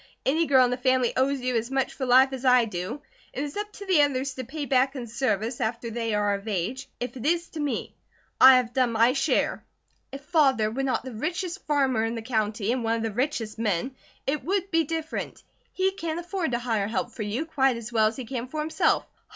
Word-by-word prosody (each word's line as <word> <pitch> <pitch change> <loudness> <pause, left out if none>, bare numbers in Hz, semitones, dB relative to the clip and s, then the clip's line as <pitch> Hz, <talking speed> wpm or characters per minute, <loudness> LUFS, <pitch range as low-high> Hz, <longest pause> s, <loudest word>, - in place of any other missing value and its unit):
Any 320 +4 +2
girl 260 -2 +6
in 245 - -1
the 250 - -1
family 255 -1 +2
owes 270 +1 +1
you 250 0 -1
as 230 +1 -1
much 270 0 -1
for 260 - -4
life 260 +2 +6
as 260 -1 -5
I 250 -2 +5
do; 215 +7 -5 0.3
it 280 - -3
is 290 -1 -6
up 415 0 -4
to 405 - -9
the 370 -6 +4
others 270 -2 0
to 260 - -6
pay 285 +4 -5
back 265 0 +2
in 250 -3 -5
service, 235 -1 -1
after 230 +1 -2
they 230 -1 -2
are 205 -1 +1
of 200 +2 -5
age, 225 +8 -3
if 245 +2 -4
it 245 - -7
is 340 +2 +1
to 320 - -8
me. 290 -2 -2 0.5
I 265 0 +10
have 245 -1 -1
done 250 -2 +2
my 230 +3 +4
share. 275 - 0 0.5
If 275 - -7
Father 270 -8 +2
were 260 +4 -2
not 270 -1 0
the 260 -1 -7
richest 345 - -4
farmer 270 -6 +2
in 225 +1 -1
the 225 - -5
county, 220 -2 -1
and 250 -1 -1
one 225 0 +1
of 225 - -3
the 225 - -1
richest 230 -2 -2
men, 220 +4 -1 0.3
it 280 0 -1
would 385 +4 -1
be 330 -1 +3
different. 320 +1 -4 0.3
He 380 0 +1
can 335 -4 -4
afford 345 -4 -3
to - - +2
hire 225 -4 -1
help 230 +2 -2
for 230 - -8
you, 215 +9 -2
quite 270 -5 +1
as 235 0 -8
well 220 -1 +4
as 220 - -3
he 260 - -6
can 250 0 -4
for 305 +4 -5
himself." 310 +1 +1
255 Hz, 235 wpm, -26 LUFS, 230-290 Hz, 0.5 s, I